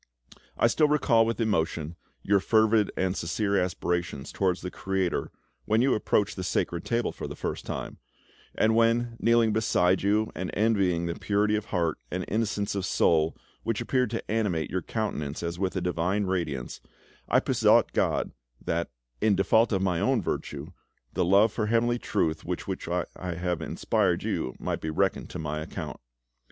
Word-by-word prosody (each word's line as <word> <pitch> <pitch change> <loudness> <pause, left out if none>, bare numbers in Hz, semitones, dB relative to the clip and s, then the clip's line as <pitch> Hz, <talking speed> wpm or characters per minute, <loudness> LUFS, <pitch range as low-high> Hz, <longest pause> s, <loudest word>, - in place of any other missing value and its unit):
I - - +3
still 150 +6 +4
recall 120 -6 +3
with 115 - -2
emotion 85 -7 0 0.3
your 100 0 +3
fervid 110 0 +3
and 95 0 0
sincere 100 +4 -1
aspirations 90 -4 -2
towards 95 -2 0
the 90 - -5
Creator 95 -2 -1 0.4
when 110 +3 +3
you 135 - +3
approached 100 -1 +1
the 95 - -3
Sacred 85 -1 -1
Table 120 0 0
for - - -6
the - - -7
first - - -4
time, - - -5 0.6
and 110 +1 +3
when, 115 +1 +2
kneeling 115 -2 +3
beside 95 -4 +2
you, 105 +2 +1
and 90 0 -4
envying 100 -6 +2
the 85 - -1
purity 105 +1 +1
of 105 - -2
heart 85 -5 -1
and 90 0 -3
innocence 105 -1 -1
of 100 -2 -2
soul 80 -3 +2 0.2
which 115 -2 -1
appeared 125 -3 +1
to 115 -2 -4
animate 100 -8 0
your 95 - -1
countenance 80 -8 -3
as 85 +1 -3
with 95 -1 -1
a 95 - -1
divine 90 +3 0
radiance, 85 -9 -3 0.5
I - - +5
besought - - +3
God - - +1 0.3
that, 85 +1 -2 0.3
in 105 -1 +4
default 110 +5 +3
of 95 -2 +1
my 90 -3 +1
own 130 +3 +2
virtue, 75 -4 -4 0.4
the 95 - +1
love 100 +5 +5
for 110 -2 -1
heavenly 120 +2 +2
Truth 80 -9 -1
with 90 0 -4
which 95 -3 -4
I 90 0 0
have 90 -1 -2
inspired 80 - 0
you 65 - -2
might - - -3
be 80 - -3
reckoned 80 - 0
to - - -6
my 75 -1 -3
account. 75 - -6
95 Hz, 170 wpm, -27 LUFS, 85-110 Hz, 0.6 s, I